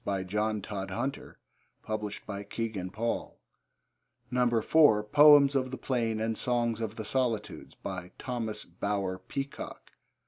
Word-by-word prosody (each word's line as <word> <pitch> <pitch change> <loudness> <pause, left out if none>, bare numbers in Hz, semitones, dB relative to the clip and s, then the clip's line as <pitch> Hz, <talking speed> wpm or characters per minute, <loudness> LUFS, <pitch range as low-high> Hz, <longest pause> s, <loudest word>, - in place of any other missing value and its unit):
By 100 -2 -1
John 105 +2 -1
Todhunter. 105 +6 -4 1.1
(Kegan 110 -6 -3
Paul.) 115 +4 -3 1.2
(4) 145 -10 +5
Poems 145 +4 +7
of 130 -1 +1
the 130 - -5
Plain 115 -4 -1
and 110 0 -1
Songs 120 -1 0
of 110 -1 -3
the 110 -2 -5
Solitudes. 115 -4 -2
By 90 - -6
Thomas 115 -4 -4
Bower 95 +1 -2
Peacock. 135 +9 -6
110 Hz, 110 wpm, -30 LUFS, 105-125 Hz, 1.2 s, Poems